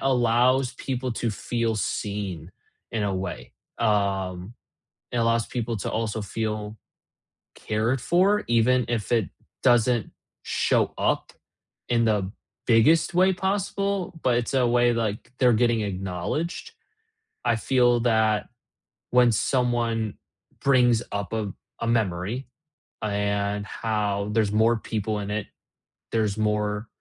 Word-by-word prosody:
allows 125 Hz, 0 st, +2 dB
people 130 Hz, -1 st, -3 dB
to 115 Hz, -, -1 dB
feel 115 Hz, +1 st, -1 dB
seen 100 Hz, -5 st, -3 dB, 0.4 s
in 110 Hz, -, -1 dB
a 100 Hz, -2 st, 0 dB
way, 95 Hz, 0 st, -5 dB, 0.3 s
um, 100 Hz, -2 st, 0 dB, 0.6 s
it -, -, -4 dB
allows 115 Hz, -1 st, +2 dB
people 120 Hz, -1 st, -3 dB
to -, -, -3 dB
also 110 Hz, -1 st, -2 dB
feel 105 Hz, +1 st, -3 dB, 0.8 s
cared 110 Hz, +4 st, -1 dB
for 195 Hz, +8 st, +3 dB
even 120 Hz, +2 st, +3 dB
if 115 Hz, -2 st, -2 dB
it 115 Hz, -5 st, +2 dB, 0.3 s
doesn't 120 Hz, -3 st, +3 dB, 0.3 s
show -, -, +1 dB
up -, -, 0 dB, 0.6 s
in 120 Hz, -1 st, +3 dB
the 100 Hz, -3 st, +1 dB, 0.4 s
biggest 125 Hz, +10 st, +4 dB
way 185 Hz, +2 st, +4 dB
possible, 195 Hz, -1 st, -2 dB
but 125 Hz, -2 st, +3 dB
it's 120 Hz, +2 st, -2 dB
a 130 Hz, -2 st, +3 dB
way, 120 Hz, 0 st, +3 dB
like, 110 Hz, 0 st, -3 dB
they're 125 Hz, -2 st, +5 dB
getting 115 Hz, 0 st, +2 dB
acknowledged. 95 Hz, -, -3 dB, 0.7 s
I 120 Hz, -2 st, +2 dB
feel 120 Hz, 0 st, +3 dB
that 110 Hz, -3 st, +2 dB, 0.6 s
when 125 Hz, -1 st, +5 dB
someone 115 Hz, -2 st, 0 dB, 0.4 s
brings 125 Hz, -4 st, +4 dB
up 100 Hz, -3 st, -3 dB
a 105 Hz, -4 st, -2 dB, 0.3 s
a 115 Hz, -, -1 dB
memory, 110 Hz, +2 st, -1 dB, 0.6 s
uh, 110 Hz, -, -1 dB
and 100 Hz, 0 st, -1 dB
how 105 Hz, -3 st, -1 dB
there's 105 Hz, -2 st, +1 dB
more 115 Hz, +2 st, +4 dB
people 110 Hz, -1 st, -3 dB
in 100 Hz, -, -5 dB
it, 105 Hz, -1 st, -2 dB, 0.7 s
there's 110 Hz, -2 st, +1 dB
more, 105 Hz, 0 st, 0 dB
115 Hz, 125 wpm, -25 LUFS, 105-125 Hz, 0.8 s, they're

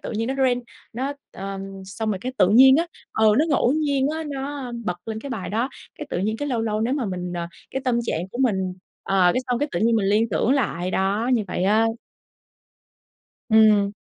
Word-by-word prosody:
tự -, -, -6 dB
nhiên 225 Hz, +3 st, -2 dB
nó 265 Hz, -, -1 dB
rên, 255 Hz, -2 st, +1 dB, 0.3 s
nó 265 Hz, +5 st, -2 dB, 0.2 s
ờm, 195 Hz, 0 st, -6 dB, 0.2 s
xong 215 Hz, +3 st, -3 dB
rồi 195 Hz, -, -2 dB
cái 255 Hz, +5 st, -4 dB
tự 180 Hz, -, +5 dB
nhiên 265 Hz, +5 st, +7 dB
á, 335 Hz, +2 st, +1 dB, 0.3 s
ờ, 220 Hz, -, +1 dB
nó 300 Hz, -, +4 dB
ngẫu 270 Hz, -3 st, +3 dB
nhiên 285 Hz, -3 st, +1 dB
á, 320 Hz, -, -3 dB
nó, 280 Hz, 0 st, -4 dB
ơ, 240 Hz, -, -7 dB
bật 180 Hz, -3 st, -2 dB
lên 220 Hz, 0 st, -4 dB
cái 280 Hz, -, -7 dB
bài 220 Hz, -7 st, -4 dB
đó. 230 Hz, +6 st, 0 dB, 0.3 s
Cái 300 Hz, -, -6 dB
tự -, -, -1 dB
nhiên 215 Hz, +4 st, -1 dB
cái 290 Hz, +3 st, -3 dB
lâu 240 Hz, -3 st, 0 dB
lâu 215 Hz, -1 st, -1 dB
nếu 240 Hz, +4 st, +1 dB
mà 275 Hz, -5 st, -1 dB
mình, 180 Hz, -1 st, -4 dB
ờ, 170 Hz, -1 st, -3 dB, 0.2 s
cái 265 Hz, -, -3 dB
tâm 245 Hz, -2 st, +2 dB
trạng 180 Hz, -5 st, -3 dB
của 240 Hz, -, -6 dB
mình 190 Hz, -6 st, +1 dB, 0.3 s
ờ, 185 Hz, -2 st, +3 dB
cái -, -, +1 dB
xong 245 Hz, -1 st, 0 dB
cái 290 Hz, +2 st, -1 dB
tự 170 Hz, -, -1 dB
nhiên 230 Hz, +1 st, +3 dB
mình 200 Hz, -3 st, +1 dB
liên 215 Hz, +3 st, +2 dB
tưởng 205 Hz, +5 st, +1 dB
lại 185 Hz, -10 st, 0 dB
đó, 200 Hz, +6 st, 0 dB
như 230 Hz, -4 st, +2 dB
vậy 180 Hz, -, -1 dB
á. 215 Hz, +3 st, +4 dB, 1.6 s
Ừm. 215 Hz, -2 st, +5 dB
225 Hz, 230 wpm, -23 LUFS, 195-265 Hz, 1.6 s, nhiên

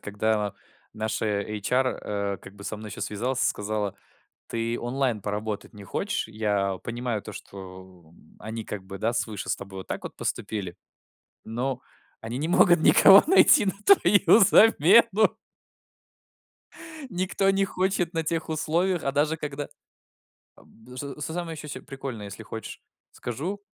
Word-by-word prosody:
когда 105 Hz, 0 st, -1 dB, 0.4 s
наша 110 Hz, 0 st, -2 dB, 0.2 s
эйчар, 105 Hz, +6 st, -1 dB
э, 100 Hz, -5 st, -3 dB
как 100 Hz, -, -14 dB
бы 100 Hz, 0 st, -12 dB
со 110 Hz, -, -3 dB
мной 105 Hz, 0 st, -9 dB
еще -, -, -8 dB
связалась 125 Hz, +5 st, -2 dB
и -, -, +3 dB
сказала: 105 Hz, -1 st, -1 dB, 0.5 s
"Ты 115 Hz, +1 st, -2 dB
онлайн 120 Hz, -2 st, -1 dB
поработать 105 Hz, +1 st, -4 dB
не 105 Hz, -2 st, -11 dB
хочешь? 205 Hz, -, -3 dB
Я 105 Hz, -3 st, -1 dB
понимаю 120 Hz, -2 st, -3 dB
то, 105 Hz, -, -9 dB
что 95 Hz, -4 st, -12 dB, 0.3 s
они 110 Hz, +1 st, -6 dB
как 105 Hz, -2 st, -6 dB
бы, 95 Hz, +1 st, -9 dB
да, 110 Hz, +4 st, -1 dB
свыше 110 Hz, -4 st, -3 dB
с -, -, +2 dB
тобой 95 Hz, -1 st, -9 dB
вот 95 Hz, -, -10 dB
так -, -, -5 dB
вот -, -, -8 dB
поступили, 95 Hz, -5 st, -4 dB, 0.7 s
но 125 Hz, +3 st, -3 dB, 0.4 s
они 115 Hz, +3 st, -5 dB
не 155 Hz, +3 st, -2 dB
могут 175 Hz, -1 st, +5 dB
никого 195 Hz, +4 st, +8 dB
найти 315 Hz, -, +7 dB
на 190 Hz, -, +2 dB
твою 205 Hz, -, +6 dB
замену" 215 Hz, +1 st, +5 dB, 1.7 s
"никто 190 Hz, 0 st, 0 dB
не 195 Hz, 0 st, +1 dB
хочет 185 Hz, -2 st, -1 dB
на 165 Hz, -1 st, -1 dB
тех 160 Hz, 0 st, -2 dB
условиях, 165 Hz, +3 st, 0 dB
а 135 Hz, -, 0 dB
даже 150 Hz, +3 st, +1 dB
когда" 145 Hz, -2 st, -5 dB, 0.9 s
Аб -, -, -20 dB, 0.3 s
что 140 Hz, +2 st, -7 dB
с -, -, -3 dB
самое 165 Hz, +1 st, -5 dB
еще 150 Hz, -, -7 dB
прикольное, 135 Hz, -6 st, -7 dB
если 100 Hz, +2 st, -8 dB
хочешь, 110 Hz, +1 st, -8 dB, 0.3 s
скажу. 165 Hz, -, -5 dB
120 Hz, 150 wpm, -26 LUFS, 105-160 Hz, 1.7 s, никого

